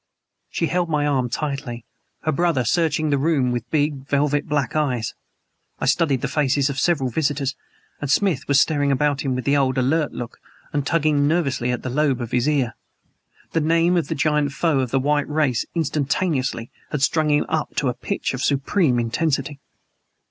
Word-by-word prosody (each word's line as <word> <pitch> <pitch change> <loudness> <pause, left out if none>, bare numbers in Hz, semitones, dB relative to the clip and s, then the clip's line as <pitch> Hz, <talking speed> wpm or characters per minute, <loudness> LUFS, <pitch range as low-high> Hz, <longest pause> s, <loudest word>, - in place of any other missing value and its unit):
She 165 - -1
held 175 +1 0
my 150 -2 +1
arm 130 -4 +1
tightly. 135 -4 -4 0.4
Her 155 - +1
brother 165 -2 +1
was 120 - 0
searching 155 -2 +1
the 140 - +2
room 140 -4 +1
with 120 -1 -3
big, 145 -1 -1
velvet 145 +1 +1
black 145 -4 -1
eyes. 125 -8 0 0.7
I - - -2
studied 145 -7 +2
the - - -1
faces 140 -1 +1
of 135 - -7
the - - 0
several 140 -8 +1
visitors; 140 -1 -1 0.4
and 145 - -4
Smith 160 -3 +1
was 140 -1 +4
staring 145 -3 +2
about 145 +1 +1
him 135 -3 -1
with 130 - -4
the 140 - +3
old 135 -2 +1
alert 145 +4 +1
look, 120 -1 -7 0.3
and 145 -1 -1
tugging 150 -3 +2
nervously 135 -7 0
at 125 - -3
the 130 - -3
lobe 140 -2 +1
of 120 -1 -5
his 125 +3 +1
ear. 130 -6 +1 0.8
The 165 - +1
name 165 +3 +3
of 170 - +1
the 165 - -2
giant 150 -1 +1
foe 155 -1 +1
of 130 -2 -1
the 135 - +1
white 145 +2 0
race 150 -6 0
instantaneously 145 -5 -1 0.2
had 145 -3 -2
strung 155 0 +2
him 145 0 +2
up 160 -1 -2
to 140 - 0
a 125 - +1
pitch 120 +2 -3
of 125 - -4
supreme 140 -1 +1
intensity. 140 +3 -1
145 Hz, 190 wpm, -22 LUFS, 130-155 Hz, 0.8 s, was